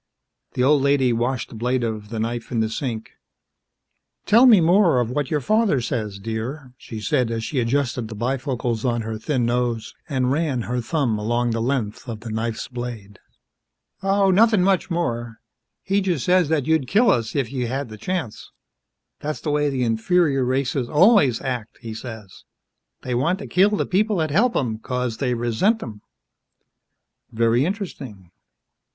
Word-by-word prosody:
The 125 - 0
old 145 +1 +4
lady 135 -3 +3
washed 120 +2 -1
the - - -11
blade 125 +2 0
of 110 -2 -4
the 115 -1 -4
knife 115 +1 -3
in 120 - 0
the 110 0 0
sink. 115 -3 -4 1.1
"Tell 235 +5 +6
me 220 -6 +8
more 170 -4 +4
of 120 -1 -1
what 145 0 -2
your 150 -2 0
father 215 - +2
says, 110 -5 -3
dear," 115 +6 -5
she 110 -3 -9
said 115 +2 0
as 115 -1 -3
she 135 +3 -2
adjusted 120 -1 0
the 110 - -8
bifocals 120 -1 -2
on 120 -3 0
her 110 0 -5
thin 125 0 0
nose 120 -1 -1 0.2
and 130 -3 0
ran 140 -5 0
her 125 +2 -2
thumb 120 -5 -1
along 120 +3 0
the 115 0 -1
length 120 -2 -2
of 110 -2 -6
the 115 -1 -7
knife's 110 +1 -3
blade. 120 -5 -7 0.8
"Oh, 195 0 +3
nothin' 215 0 +4
much 190 0 +2
more. 120 -10 -2 0.5
He 195 +1 +1
just 175 -8 -1
says 180 -3 +3
that 155 -5 +1
you'd 160 -4 +1
kill 220 - +4
us 115 -1 -1
if 135 -6 -1
you 125 -3 -2
had 135 +1 -3
th' 110 -1 -11
chance. 175 - -4 0.7
That's 150 +1 -4
the 150 - -2
way 150 0 +1
the 130 -2 -1
inferior 135 +5 +2
races 130 0 -1
always 155 - +5
act, 125 -4 -4
he 115 -2 -7
says. 110 -4 -9 0.6
They 125 - -3
want 160 +10 +1
to 200 - -8
kill 190 +3 +3
th' - - -1
people 210 +3 +1
that 160 -4 0
help 230 - +2
'em, 110 -5 -1
'cause 125 -1 -3
they 125 -2 0
resent 120 - +1
'em." 105 -3 -9 1.3
"Very 115 +3 +2
interesting." 135 - -6
125 Hz, 175 wpm, -22 LUFS, 115-155 Hz, 1.3 s, me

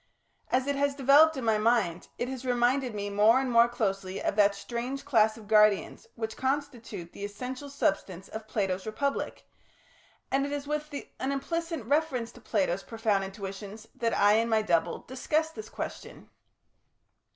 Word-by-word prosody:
As 255 +1 +2
it 285 0 0
has 285 0 +1
developed 285 +3 +6
in 260 - -3
my 220 -1 +3
mind, 215 -7 +1
it 245 - -2
has 260 -1 -5
reminded 245 0 +1
me 205 0 -3
more 215 +5 +5
and 265 -2 -1
more 235 0 +6
closely 195 -5 -2
of - - -1
that 205 -1 +4
strange 245 +6 -5
class 220 -6 +3
of 215 -2 -13
guardians 215 -2 +3
which 220 -1 -4
constitutes 250 -9 -3
the 200 - -9
essential 250 +7 -6
substance 275 - -1
of 220 0 -8
Plato's 195 -3 -1
Republic, 275 +6 -2 0.9
and 270 +1 +2
it 285 - -3
is 290 -1 -3
with 300 +1 -3 0.3
an 265 - -1
implicit 330 0 -3
reference 275 -4 0
to - - -16
Plato's 195 -3 0
profound 220 -3 0
intuitions 195 +2 -7
that 230 -1 -1
I 205 +1 +5
and 230 +1 +1
my 220 -1 +3
double 170 -5 0
discuss 305 +5 0
this 430 +6 -9
question. - - -7
235 Hz, 165 wpm, -29 LUFS, 205-275 Hz, 0.9 s, developed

